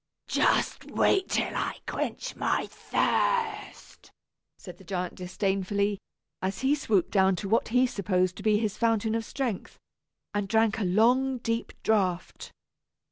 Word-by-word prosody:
"Just - - +1
wait 385 -1 +2
till - - 0
I - - -2
quench - - -3
my - - 0
thirst," 430 -4 -1 0.5
said 180 -2 -11
the - - -14
giant 180 -1 -3
disdainfully, 195 +2 -1 0.4
as 190 0 -2
he 265 +2 +3
stooped 220 - +1
down 190 -2 +4
to 195 - -5
what 225 +4 +2
he 250 +2 +3
supposed 185 -5 0
to - - -7
be 215 0 +3
his 210 -2 -2
fountain 225 -1 +1
of 225 0 -1
strength, 240 -6 -4 0.6
and 205 -1 -1
drank 225 +1 +2
a 205 - 0
long, 250 +8 +3
deep 230 -1 -3
draught. 185 -5 0
210 Hz, 140 wpm, -28 LUFS, 190-230 Hz, 0.6 s, down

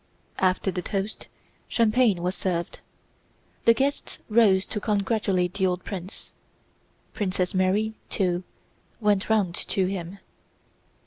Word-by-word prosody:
After 185 +1 +2
the 180 -1 -4
roast, 200 +1 -2 0.4
champagne 220 -5 +3
was 180 +1 0
served. 175 -3 -2 0.9
The 230 - +7
guests 275 +3 -1
rose 205 -4 +5
to 210 - -2
congratulate 200 -3 0
the 190 -1 +1
old 180 0 -2
prince. 190 -1 -7 0.8
Princess 185 -2 -1
Mary, 195 +4 +2 0.2
too, 180 -2 0 0.6
went 210 -2 +2
round 205 -6 +2
to 190 +2 0
him. 185 0 -4
195 Hz, 115 wpm, -26 LUFS, 185-215 Hz, 0.9 s, The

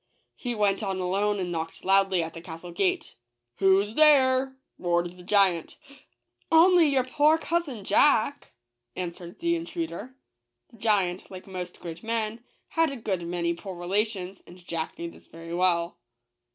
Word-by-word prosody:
He 245 -2 -4
went 205 -1 +1
on 195 -3 -2
alone, 200 +3 0
and 180 -2 -3
knocked 165 -1 -5
loudly 195 -2 +3
at 160 0 -6
the 165 - -9
castle 170 +1 -9
gate. 360 - -1 0.4
"Who's 195 +2 +3
there?" 265 -2 +5 0.2
roared 175 -1 0
the 180 - -13
giant. 185 -3 +2 0.4
" - - -45
Only 335 0 +6
your 270 -3 +2
poor 300 +4 +3
cousin 320 -10 -2
Jack," 280 +5 +2 0.4
answered 175 -1 -6
the 340 0 +1
intruder. 330 -6 -5 0.6
The 230 - -17
giant, 195 -5 +1
like 185 -1 -9
most 180 -2 -7
great 170 0 -8
men, 225 0 -2 0.3
had 325 -2 +2
a - - -5
good 195 -6 -2
many 170 -1 -1
poor 185 +2 -8
relations, 190 +1 -2
and 175 - -13
Jack 165 -2 -4
knew 170 0 -5
this - - -18
very 165 +1 -9
well. 175 -1 +1
195 Hz, 155 wpm, -27 LUFS, 175-260 Hz, 0.6 s, Only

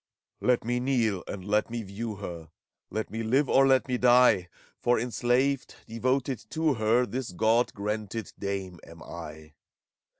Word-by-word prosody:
Let 125 -1 +2
me 120 +1 0
kneel, 120 -7 0
and 95 -2 -6
let 105 +2 +1
me 115 0 -4
view 105 +3 -5
her, 85 -5 -7 0.4
Let 110 0 -4
me 115 +1 -3
live, 130 +6 +2
or 135 +1 +5
let 130 0 +3
me 125 -1 -1
die! 125 -7 +5 0.3
For 120 -1 +2
enslaved, 125 +3 0
devoted 130 +3 -1
to 160 -1 +1
her. 115 +2 +2
This 125 -2 -4
Gk>d 110 +6 +2
granted 105 +1 -4
Dame, 95 -3 -4
am 85 0 -13
I. 80 -2 -9
115 Hz, 155 wpm, -28 LUFS, 100-125 Hz, 0.4 s, or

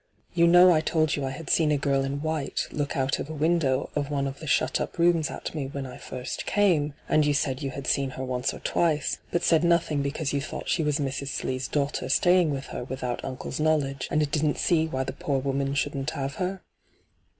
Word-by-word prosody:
You 170 -1 +4
know 175 +1 +8
I 155 - +3
told 155 -2 +1
you 145 - -3
I - - -2
had 145 +3 -7
seen 155 -2 +3
a 150 - +3
girl 140 -1 +1
in 140 +2 -3
white 155 -3 -1
look 145 -1 -2
out 135 0 0
of 145 - -5
a 155 - -5
window 150 -4 +1
of 145 -1 -1
one 140 -2 -1
of 135 0 -5
the 160 - -8
shut 155 - +1
up - - -4
rooms 170 -2 +3
at - - -6
me 145 -4 -3
when 140 0 -5
I 130 - -8
first 125 0 -6
came, 160 -8 +2
and 155 - +3
you 145 -1 +2
said 135 -1 0
you 140 - -2
had 135 +1 -7
seen 135 0 +1
her 130 - -3
once 125 0 -1
or - - -8
twice, 155 -4 0
but 175 - -1
said 165 -1 +4
nothing 170 -4 +2
because 140 +1 -2
you 140 - 0
thought 140 - -6
she 170 - +2
was 150 -2 +1
Mrs. 140 -1 -3
Slee's 130 -2 -2
daughter 140 -3 -1
staying 175 +3 +4
with 140 -1 -3
her - - -4
without 125 -1 -4
uncle's 130 +2 -5
knowledge, 145 -4 +1
and 155 - +2
didn't 150 -1 +1
see 160 -2 +2
why 130 -4 -2
tiie - - -7
poor 140 -2 0
woman 135 +1 -1
shouldn't 145 0 -1
have 140 -3 -4
her 185 +1 -2
145 Hz, 230 wpm, -26 LUFS, 135-160 Hz, -, know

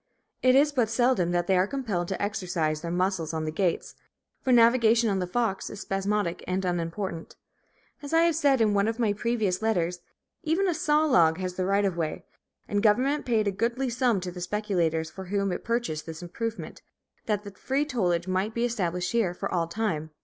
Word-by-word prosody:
It 255 0 +5
is 290 +2 +5
but 245 -6 +1
seldom 240 -6 +2
that 175 0 0
they 190 - +2
are 185 +1 +3
compelled 210 -10 -2
to 190 - -3
exercise 180 -7 -1
their 170 - -4
muscles 175 -2 -1
on 160 0 -2
the 155 - -2
gates; 175 +1 -1 0.5
for 260 - 0
navigation 230 -1 +5
on 195 - 0
the 180 - -2
Fox 215 0 -1
is 205 - -8
spasmodic 195 -2 -1
and 185 +1 -1
unimportant. 170 0 -3 0.7
As 285 - -7
I 325 0 +4
have 335 -2 +3
said 280 -5 +3
in 215 -2 +3
one 200 +1 +2
of 225 0 -1
my 225 -4 +1
previous 210 -3 -1
letters, 180 -6 0 0.4
even 350 +4 +1
a 355 - +2
saw 310 -1 +2
log 165 - +4
has 185 -1 -3
the 185 0 -2
right 200 +1 +2
of 190 -3 0
way; 160 -2 -3 0.4
and 205 0 0
government 255 +8 +2
paid 220 -3 +2
a - - +2
goodly 240 +6 -1
sum 235 -3 +1
to 180 0 -5
the 180 0 -8
speculators 175 -5 -1
from 190 +2 -9
whom 200 0 0
it 180 - -4
purchased 230 -11 -2
this 160 +1 -7
improvement, 230 +6 -5 0.5
that 205 -2 -2
free 275 +3 0
tollage 180 - 0
might 190 +4 -1
be 235 +1 +1
established 180 -6 -1
here 215 -7 +1
for 195 +1 -4
all 170 -2 +1
time. 170 -5 -2
200 Hz, 200 wpm, -27 LUFS, 180-235 Hz, 0.7 s, It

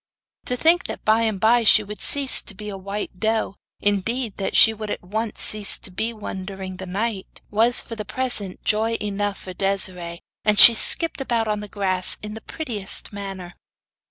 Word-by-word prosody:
To 250 - -2
think 330 +6 +2
that - - -8
by 220 +1 +3
and 220 -4 -2
by 235 +3 +3
she 215 0 +5
would 210 +1 -9
cease 280 -2 +6
to 205 - -10
be 210 +2 -8
a 200 - -7
white 195 -1 -7
doe 220 -2 -1 0.3
indeed, 205 +3 -2
that 195 - -4
she 225 - +6
would 215 -1 -8
at - - -5
once 215 +4 -4
cease 210 -2 +1
to - - -8
be 220 +5 -3
one 205 -4 -8
during 190 -1 -8
the 190 0 -8
night 200 +1 -5
was 230 +3 +3
for 230 - -9
the 215 - -6
present 215 -7 -4
joy 225 +1 0
enough 205 -1 -3
for 185 - -10
Desiree, 180 -3 -1 0.2
and 210 -1 +1
she 235 - +12
skipped 325 +7 +1
about 235 -4 -2
on 210 -1 -2
the 210 - -8
grass 190 -3 -2
in 210 0 -7
the 220 - -10
prettiest 215 -11 -4
manner. 195 -3 -8
210 Hz, 195 wpm, -21 LUFS, 195-225 Hz, 0.3 s, she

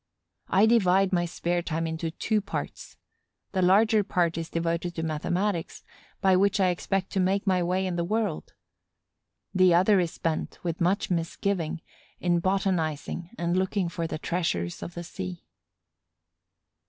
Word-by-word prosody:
I 195 +3 +5
divide 195 -4 +4
my 175 -1 +2
spare 175 +1 -1
time 165 -1 -2
into 160 0 -3
two 210 +6 0
parts. 200 - -6 0.5
The 190 - 0
larger 210 +4 +4
part 175 -4 +1
is 165 0 -4
devoted 170 +1 -2
to 160 - -3
mathematics, 170 +4 -2 0.4
by 190 -2 +5
which 200 +2 +3
I 185 -1 +4
expect 185 +2 -1
to 195 - 0
make 190 +2 +1
my 185 -2 +2
way 180 +2 0
in 180 -2 -2
the 170 - 0
world; 210 -2 -2 1.0
the 185 -2 +5
other 190 +3 +5
is 175 -2 +1
spent, 165 -1 -3
with 170 -1 -3
much 185 +3 +1
misgiving, 170 0 -1 0.4
in 175 -1 +2
botanizing 175 -3 -1
and 170 +1 0
looking 190 -1 0
for 165 0 -3
the 160 - -4
treasures 155 - -2
of 175 - -7
the 170 - -5
sea. 180 0 -7
180 Hz, 155 wpm, -27 LUFS, 170-195 Hz, 1.0 s, I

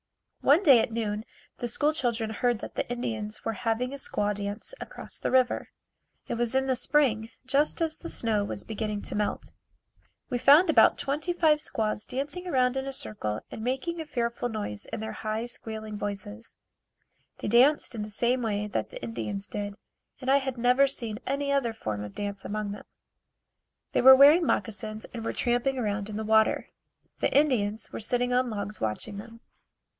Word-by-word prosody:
One 300 +8 +4
day 270 -8 +8
at 225 - 0
noon 215 -2 -2 0.4
the 240 - -2
school 295 +6 +1
children 235 -6 -1
heard 240 +2 +1
that - - -7
the - - -3
Indians 220 -3 -4
were 225 - 0
having 230 +5 -1
a - - -5
squaw 210 -6 0
dance 205 - -5
across - - -7
the - - -1
river. 255 -1 +2 0.6
It - - -2
was 235 +1 -1
in 265 0 +3
the 260 -1 +1
spring, 235 -5 +2 0.2
just 280 +4 +1
as 325 -2 -1
the 335 - -7
snow 220 -3 +1
was 205 - -4
beginning 215 -1 -4
to - - -4
melt. 210 0 -2 0.8
We 245 - 0
found 310 +7 +7
about - - +6
twenty 300 +5 -2
five 315 -3 +3
squaws 215 -6 -2
dancing 290 +8 -4
around 255 -5 +2
in 265 0 -2
a - - -2
circle 105 - -2
and 220 - -6
making 270 +7 -2
a - - -6
fearful 240 -3 -2
noise 205 - -5
in 225 - -5
their 220 - -4
high 220 +1 -3
squealing 220 -2 -6
voices. 195 - -6 0.8
They - - -5
danced 250 +6 +4
in 225 - -4
the 210 - -5
same 240 +4 +1
way 210 -3 -1
that 210 - -3
the - - -9
Indians 205 -3 -4
did, 205 -1 -4 0.4
and 260 0 0
I 275 - +6
had 265 -2 -3
never 250 +3 +4
seen 230 -5 -3
any 280 +1 -1
other 265 -5 +1
form 105 - -4
of 105 -1 -9
dancing 200 -1 -5
among 210 0 -2
them. 205 - -8 1.1
They - - +2
were 265 +1 +10
wearing 295 +5 +7
moccasins 215 -1 -1
and 230 -2 -5
were - - -2
tramping 245 +3 0
around 210 -3 -2
in 210 - -5
the 220 - -3
water. 220 0 +3 0.5
The - - +1
Indians 225 -7 +1
were - - -5
sitting 245 +2 +1
on 250 0 +2
logs 210 -1 -5
watching 110 - -2
them. 230 +2 -11
230 Hz, 190 wpm, -28 LUFS, 210-265 Hz, 1.1 s, were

